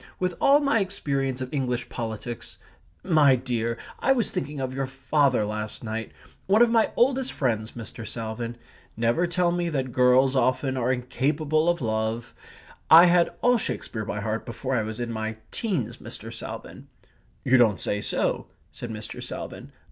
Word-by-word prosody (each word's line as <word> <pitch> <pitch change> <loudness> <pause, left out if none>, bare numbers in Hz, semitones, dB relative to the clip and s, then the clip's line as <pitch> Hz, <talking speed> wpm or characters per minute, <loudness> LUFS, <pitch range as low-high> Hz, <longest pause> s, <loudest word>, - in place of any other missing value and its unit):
With 180 -1 -1
all 280 +1 +6
my 275 -5 +3
experience 140 -9 -1
of 130 +2 -5
English 125 -3 -1
politics 115 0 -6 0.5
My 155 -7 +5
dear, 120 -2 -2 0.2
I 270 - +4
was 240 -5 0
thinking 145 +1 -4
of 130 -1 -3
your 135 0 -2
father 135 -3 +1
last 105 +2 -4
night 110 0 -4 0.4
one 210 +5 +6
of 235 - +3
my 225 -2 +4
oldest 265 +1 +2
friends, 110 -5 -1
Mr. 115 -1 -8
Salvin. 115 +1 -5 0.4
Never 120 +10 +2
tell 175 0 +1
me 175 0 -1
that 135 -5 -2
girls 130 +2 +4
often 130 +1 +1
are 125 0 +1
incapable 145 +5 0
of 175 -2 0
love! 110 +1 -2 0.6
I 165 +2 +10
had 175 -1 +4
all 245 -1 +4
Shakespeare 110 - -4
by 105 0 -4
heart 110 +1 -2
before 125 +3 -4
I 120 - +2
was 110 +1 -5
in 120 -1 -3
my 110 0 -3
teens, 185 - -2
Mr. - - -9
Salvin!" - - -8 0.6
"You 130 0 +5
don't 110 -6 +4
say 105 - -1
so," - - -1 0.2
said 120 - -7
Mr. 110 -1 -6
Salvin. - - -7
130 Hz, 165 wpm, -26 LUFS, 115-160 Hz, 0.6 s, I